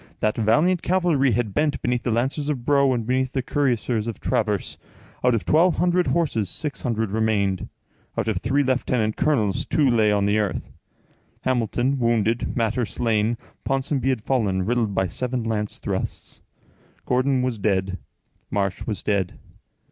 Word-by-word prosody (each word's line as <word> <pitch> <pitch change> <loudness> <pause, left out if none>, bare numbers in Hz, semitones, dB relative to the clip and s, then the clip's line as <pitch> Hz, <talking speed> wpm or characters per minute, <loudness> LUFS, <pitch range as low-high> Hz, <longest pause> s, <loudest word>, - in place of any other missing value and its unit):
That 110 0 +1
valiant 150 - +3
cavalry 170 -8 +2
had 110 -2 -1
bent 150 -2 +1
beneath 125 -1 0
the 120 - -2
lancers 135 +6 0
of 130 -5 -3
Bro 140 -2 +4
and 115 -3 -2
beneath 130 +1 0
the 130 - -1
cuirassiers 120 -5 0
of 115 - -5
Travers; 105 -3 -1 0.4
out 125 -1 +4
of 115 - -2
twelve 170 +3 +4
hundred 180 0 +2
horses, 135 - 0
six 145 - -5
hundred 110 -4 -1
remained; 100 -4 0 0.5
out - - -1
of 110 -4 0
three 140 +9 +1
lieutenant 125 -4 0
colonels, 110 -10 +1
two 150 -4 +2
lay 110 -4 +3
on 100 -1 +2
the 105 +1 +2
earth,—Hamilton 120 +5 -3
wounded, 115 -1 +1
Mater 115 +1 +1
slain. 115 0 0 0.3
Ponsonby 135 -1 0
had 125 -5 -1
fallen, 100 -9 0
riddled 115 -3 0
by 95 - +2
seven 125 +6 -3
lance 105 -2 -2
thrusts. - - -4 0.6
Gordon 130 +1 +2
was 125 -4 -2
dead. 95 -2 0 0.5
Marsh 100 -2 -2
was 105 -3 -3
dead. 100 -4 -1
120 Hz, 155 wpm, -23 LUFS, 105-135 Hz, 0.6 s, Bro